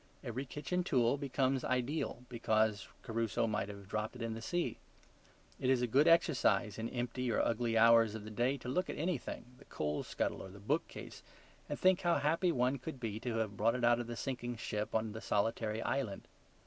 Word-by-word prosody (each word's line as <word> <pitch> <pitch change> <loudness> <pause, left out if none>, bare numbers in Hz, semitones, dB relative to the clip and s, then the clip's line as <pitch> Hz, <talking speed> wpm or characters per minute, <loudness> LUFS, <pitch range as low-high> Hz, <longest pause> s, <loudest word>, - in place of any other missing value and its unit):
Every 130 +1 -4
kitchen 150 +7 -2
tool 125 -6 +3
becomes 135 -2 0
ideal 125 0 -1
because 110 -3 +1 0.2
Crusoe 115 0 0
might 105 -2 -1
have 100 -1 -9
dropped 110 +3 -3
it 125 - -5
in 115 -1 -2
the 115 - -6
sea. 175 +9 -2 0.8
It 130 - 0
is 130 -2 +3
a - - +4
good 135 +7 +4
exercise, 160 - +3
in 115 +1 -2
empty 125 0 -2
or - - +1
ugly 115 0 +1
hours 115 -1 +6
of 110 - -6
the 110 - -8
day, 120 +6 +1
to 125 - -9
look 180 +9 0
at - - -4
anything, 160 -6 -2
the 140 - -16
coal 75 0 -2
scuttle - - -2
or - - -8
the 95 - -12
book 100 - 0
case, - - -9 0.5
and 145 - -3
think 185 -1 +4
how 175 -1 +3
happy 165 +5 +2
one 130 0 +1
could 140 0 -6
be 110 -3 -3
to 120 -1 -3
have 110 -3 -1
brought 115 +4 +2
it 125 - -3
out 120 0 +5
of 120 - -4
the 120 0 -5
sinking 120 -3 -3
ship 105 -1 -3
on 110 0 +1
to - - -7
the 110 +1 -7
solitary 110 +1 0
island. 130 -8 -2
120 Hz, 210 wpm, -34 LUFS, 110-135 Hz, 0.8 s, hours